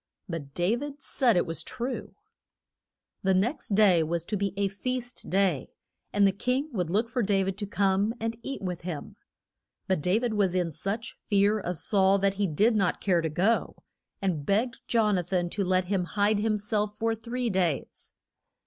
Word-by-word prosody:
But 150 -6 -6
Da 180 +6 +2
vid 285 +3 -6
said 250 -5 +2
it 175 - +2
was 165 -1 -4
true. 250 +2 -5 1.1
The 190 0 +2
next 220 +2 0
day 195 -5 +5
was 165 +1 -1
to 210 - -2
be 200 -1 -1
a 200 0 +2
feast 245 +5 -4
day, 185 -7 +1 0.4
and 205 -1 +4
the 195 - +5
king 250 +9 -1
would 180 -6 -1
look 215 +6 +1
for 245 +1 -1
Dav 195 -2 +1
id 190 - -5
to 205 - -3
come 200 +2 +1
and 225 +1 -2
eat 275 -2 -5
with 180 -2 -3
him. 170 -4 -6 0.7
But 190 -5 +1
Da 180 +6 +2
vid 235 -1 -1
was 195 -4 +1
in 175 -2 +1
such 200 +9 -4
fear 205 +1 +3
of 180 -3 -3
Saul 195 +2 +4
that 195 0 +2
he 200 - +3
did 210 +9 +2
not 195 -4 +1
care 180 -4 +2
to 160 - -1
go, 195 +9 +1 0.5
and 175 -7 0
begged 225 - 0
Jon 215 -5 +3
a - - -2
than 175 0 -1
to 200 - -1
let 185 0 +2
him 185 -1 0
hide 205 +2 +1
him 215 0 +1
self 210 0 -1
for 225 +1 +1
three 235 +2 -3
days. 175 -7 -2
200 Hz, 195 wpm, -28 LUFS, 180-225 Hz, 1.1 s, day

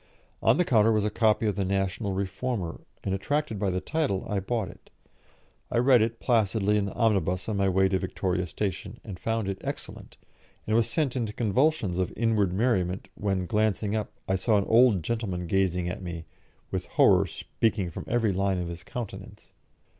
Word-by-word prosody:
On - - +4
the 180 - +3
counter 115 -4 +4
was 105 -2 +2
a 105 - 0
copy 110 0 +2
of 105 -3 +1
the 100 - 0
National 95 +1 -1
Reformer, 95 0 -3 0.2
and, 95 - -1
attracted 145 +2 -1
by 100 -1 +1
the 90 0 0
title, 140 -6 -1
I 105 - 0
bought 110 +1 -2
it. - - -15 0.8
I - - -1
read 125 -1 +5
it 115 +1 -1
placidly 105 -3 +2
in 105 -1 +1
the 100 - -5
omnibus 95 -5 +1
on 110 -2 -1
my 100 -1 +2
way 95 +1 +3
to 95 0 0
Victoria 90 -1 -2
Station, 100 +4 -4
and 95 -5 -8
found 115 -1 -1
it 95 0 -4
excellent, - - -7 0.5
and 110 - +1
was 115 -1 +3
sent 145 -6 0
into 115 -4 -2
convulsions 115 - +1
of 90 - 0
inward 110 -5 +2
merriment 95 -3 0
when, 95 -3 -1
glancing 105 +1 0
up, 110 -1 -2 0.2
I 95 - +1
saw 105 +3 +2
an 100 - +1
old 115 -6 +5
gentleman 95 -4 -2
gazing 90 -1 +1
at 90 - -4
me, 85 -2 -6 0.5
with - - -3
horror - - +4
speaking 105 -6 -1
from - - -7
every 115 -4 +1
line 95 0 +1
of 90 -1 -3
his 85 0 -7
countenance. 120 -5 -8
100 Hz, 190 wpm, -27 LUFS, 95-115 Hz, 0.8 s, read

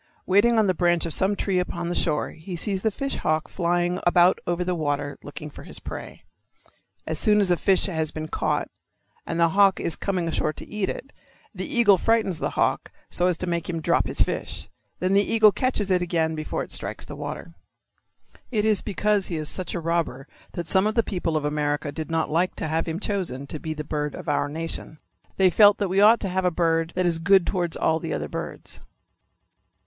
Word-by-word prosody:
Waiting 215 +5 +4
on 220 - +4
the 185 - +2
branch 175 -1 +2
of 165 - -1
some 195 +2 +2
tree 195 -2 0
upon 175 -1 -3
the 175 - -1
shore 155 -3 0
he 170 +3 -8
sees 190 +2 -1
the 220 - +2
fish 275 +6 -3
hawk 155 0 0
flying 175 0 0
about 175 +1 +4
over 175 +1 0
the 180 0 -1
water 145 -3 -2
looking 150 +1 -8
for - - -11
his - - -9
prey. - - -8 0.8
As 160 -1 -2
soon 210 -1 +4
as 195 -3 +2
a - - +5
fish 190 +2 +2
has 160 -5 -1
been 155 0 -5
caught - - -1 0.6
and 165 - -2
the 170 0 +4
hawk 195 +2 +4
is 165 - -1
coming 185 -4 -2
ashore 155 -1 0
to - - -8
eat 210 -2 -2
it, 275 - -6 0.4
the 185 -2 -5
eagle 205 -6 +4
frightens 220 -7 +1
the - - -1
hawk - - 0 0.2
so 175 - +1
as 180 -3 +1
to 185 - -3
make 170 -1 -2
him 165 -2 -2
drop 160 - +1
his - - 0
fish. - - -4 0.3
Then 185 +1 0
the 200 - +5
eagle 215 0 +5
catches 215 -5 0
it 180 -1 +3
again 165 -2 0
before 155 -1 -3
it - - -11
strikes - - 0
the - - -8
water. - - -7 1.0
It 215 -4 0
is 215 -2 +3
because 210 -1 +1
he 170 - -3
is 155 -1 -2
such 185 -3 -4
a - - -1
robber 165 -5 -2 0.3
that 170 -2 -5
some 190 +4 +3
of 215 - -2
the 230 - +3
people 175 -6 -2
of 150 - -2
America 150 0 -1
did 155 +2 -6
not 165 -1 -1
like 175 +4 +1
to - - -3
have 160 +2 -1
him 165 +1 -3
chosen 185 -11 -2
to 150 +2 -5
be 155 +1 -4
the 150 - -4
bird 150 -1 -3
of - - -9
our 145 - 0
nation. 160 0 -5 0.4
They 190 -1 +4
felt 205 +2 +6
that 200 -3 -1
we 190 +2 +2
ought 220 +3 +7
to 195 - -2
have 185 +1 -1
a 180 - +3
bird 165 -1 0
that 185 0 +1
is 170 -2 +1
good 190 +1 +4
towards 175 -3 -1
all 160 0 +1
the 165 -2 -4
other - - -3
birds. - - -6
175 Hz, 225 wpm, -24 LUFS, 160-195 Hz, 1.0 s, ought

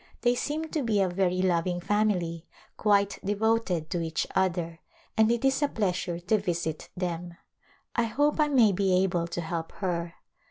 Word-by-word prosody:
They 240 +1 +3
seem 295 +5 -2
to 310 - -1
be 225 -5 +1
a 195 - +3
very 185 0 0
loving 175 -1 +1
family, 175 -4 0 0.3
quite 200 -1 +2
devoted 205 -5 0
to 175 - 0
each 160 -1 -1
other 170 -3 0 0.4
and 220 0 +4
it 235 +2 0
is 270 +2 +2
a 290 - +4
pleasure 185 -7 -1
to 215 +5 +2
visit 170 -5 -3
them. 175 -1 -4 0.6
I 235 - +2
hope 290 +7 +1
I 300 - +4
may 245 -7 +5
be 190 -1 +2
able 175 -3 0
to 175 - -4
help 165 0 -4
her. 170 -3 -3
185 Hz, 170 wpm, -28 LUFS, 170-220 Hz, 0.6 s, may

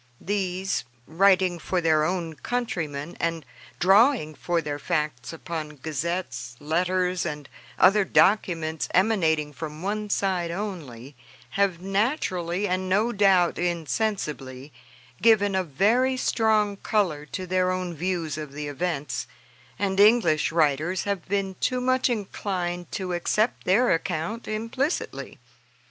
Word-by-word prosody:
These, 190 -1 -1 0.2
writing 185 +1 +3
for 180 +3 -1
their 160 -2 +3
own 170 0 -1
countrymen, 165 -6 -3
and 165 -3 -2 0.3
drawing 195 - +4
for 170 +3 -1
their 145 -2 -4
facts 150 -6 -2
upon 160 -2 -6
gazettes, 150 -4 -4
letters, 180 +3 0
and 150 -4 -5 0.3
other 200 +2 +5
documents 165 -6 +2
emanating 160 -7 +2
from 155 +2 -7
one 210 +1 -2
side 185 -4 0
only, 155 - -6 0.4
have, 195 -4 +1
naturally, 195 - 0
and 185 +1 -1
no 210 +5 +2
doubt 195 -5 +3
insensibly, 155 - -2 0.5
given 210 -3 +4
a 190 0 +1
very 225 - +2
strong 215 -4 +1
color 175 -9 0
to 185 +3 -5
their 185 0 +1
own 185 -1 -2
views 165 -2 -2
of 150 -2 -7
the 150 0 -5
events, 150 -1 -3 0.5
and 195 -1 -1
English 205 -9 +4
writers 160 +3 +1
have 200 -4 -3
been 195 -1 -1
too 255 - 0
much 255 +1 +2
inclined 185 -5 -3
to 185 -2 -3
accept 210 +6 0
their 235 +7 +4
account 170 +6 -2
implicitly. 230 +8 -3
180 Hz, 125 wpm, -25 LUFS, 160-200 Hz, 0.5 s, other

